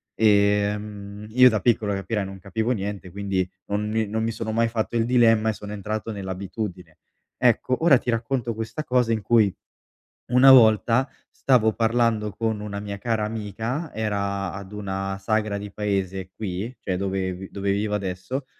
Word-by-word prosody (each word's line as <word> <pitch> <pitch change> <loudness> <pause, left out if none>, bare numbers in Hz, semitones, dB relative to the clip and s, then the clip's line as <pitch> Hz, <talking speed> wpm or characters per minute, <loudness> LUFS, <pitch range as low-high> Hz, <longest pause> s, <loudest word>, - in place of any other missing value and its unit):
Ehm, 105 -1 +1
io 125 +1 +7
da 110 - 0
piccolo, 110 -3 +2
capirai, 100 +1 -2
non 95 0 -9
capivo 110 +6 -2
niente, 100 -4 -3
quindi 95 -2 -1 0.2
non 105 +1 -1
mi 110 0 0
non 110 +2 -2
mi 115 - 0
sono 110 0 -4
mai 115 +1 +2
fatto 115 +1 -2
il 115 - +2
dilemma 115 -3 +4
e - - 0
sono 105 +1 -8
entrato 105 +2 -4
nell'abitudine. 95 -3 -6 0.4
Ecco, 125 +3 +2
ora 150 -6 +7
ti - - -6
racconto 120 0 -1
questa 110 +7 -4
cosa, 125 -4 +1
in 110 - -1
cui 105 -2 +3 0.8
una 125 +2 +7
volta 120 +1 +5 0.2
stavo 110 -5 +2
parlando 115 -2 +1
con 110 0 -2
una 100 -1 -5
mia 100 -1 -5
cara 110 0 -1
amica, 115 - -4
era 100 -3 -2
ad 95 0 -8
una 95 -1 -3
sagra 110 0 0
di 100 0 -6
paese, 95 -2 -2
qui, 105 +3 -4
cioè, 95 - -2
dove 95 -1 -2
vi 95 +1 -9
dove 100 0 -1
vivo 105 +1 -1
adesso, 95 +7 -4
105 Hz, 170 wpm, -24 LUFS, 100-115 Hz, 0.8 s, io